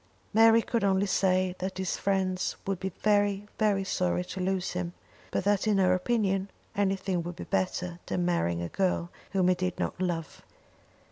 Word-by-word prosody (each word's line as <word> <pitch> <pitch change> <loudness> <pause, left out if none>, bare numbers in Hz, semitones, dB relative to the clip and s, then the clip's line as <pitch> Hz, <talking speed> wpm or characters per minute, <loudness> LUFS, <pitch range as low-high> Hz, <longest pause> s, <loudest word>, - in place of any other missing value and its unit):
Mary 225 +1 +6
could 230 -3 -1
only 195 0 +3
say 185 -1 +2
that 190 +1 -3
his 190 -1 -1
friends 190 -1 0
would 195 -2 -1
be 190 - -2
very 205 -1 +2
very 205 -3 +2
sorry 180 -1 0
to 185 - -6
lose 185 0 -1
him, 180 -1 -3 0.4
but - - -1
that 205 +1 +2
in 210 -2 +3
her 185 -1 +4
opinion 195 -1 0 0.3
anything 195 -2 0
would 175 +1 -6
be - - -7
better 170 - -2
than 180 - 0
marrying 85 - 0
a 85 - -4
girl 180 -2 0 0.2
whom 185 -2 +3
he 185 - +5
did 180 0 -2
not - - -3
love. 170 -4 -3
185 Hz, 180 wpm, -29 LUFS, 180-195 Hz, 0.4 s, Mary